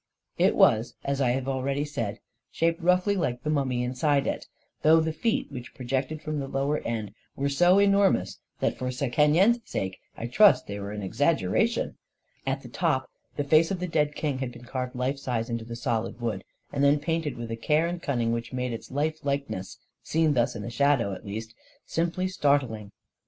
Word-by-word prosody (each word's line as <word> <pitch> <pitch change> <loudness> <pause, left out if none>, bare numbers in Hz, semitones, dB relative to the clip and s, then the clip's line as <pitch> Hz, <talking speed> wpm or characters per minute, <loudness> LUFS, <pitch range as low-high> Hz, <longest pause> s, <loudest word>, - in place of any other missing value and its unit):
It - - +4
was, 110 +2 +4
as 140 0 -1
I 130 - +3
have 130 +2 0
said - - -9
already, 135 +2 -1 0.6
shaped 165 0 0
roughly 180 +3 +3
like 125 -9 -1
the 150 - 0
mummy 130 -4 0
inside 135 +3 +1
it - - -3 0.2
— - - -47
though 160 +1 +6
the 160 0 0
feet 225 0 -1
which 125 -3 -8
pro 130 - -8
jected 135 +5 -2
from 155 -1 -2
the 135 - -4
lower 140 +3 0
end 110 -3 -4 0.2
were 140 +1 0
so 175 +7 +5
enormous 200 - +3 0.2
that, - - 0
for 125 - -2
Sekenyen's 150 - +3
sake, 95 - -4 0.2
I 115 - -4
trust 200 - +5
they 100 0 -5
were 100 0 -5
an 105 -1 -5
exaggera - - +2
tion! - - -3 0.5
At 135 +1 -1
the - - -9
top, 130 0 -1 0.2
the 145 - -1
face 155 +3 +4
of 195 - -2
the 180 - -2
dead 150 -3 +1
king 145 -4 -2
had 130 -2 -3
been 120 0 -12
carved 125 0 -4
life 130 +3 -1
size 120 -3 -2
in 115 - 0
the 115 +1 -7
solid 115 -2 -2
wood, 110 -5 -2 0.3
and 140 - 0
then 140 +1 +5
painted 155 -3 -2
with 115 -1 -6
a - - -1
care 150 +8 +2
and 175 0 -3
cunning 120 -6 0
which 115 0 -3
made 125 -1 -2
its 115 - -7
life 155 +3 -1
likeness, 140 -9 -3 0.2
seen 160 -1 +2
thus 120 -3 +1
in - - -5
the 115 - -5
shadow, 135 -5 +2
at 95 - -9
least, 110 +2 -5 0.3
simply 170 +3 -1
startling. 140 - 0
135 Hz, 205 wpm, -27 LUFS, 120-155 Hz, 0.6 s, though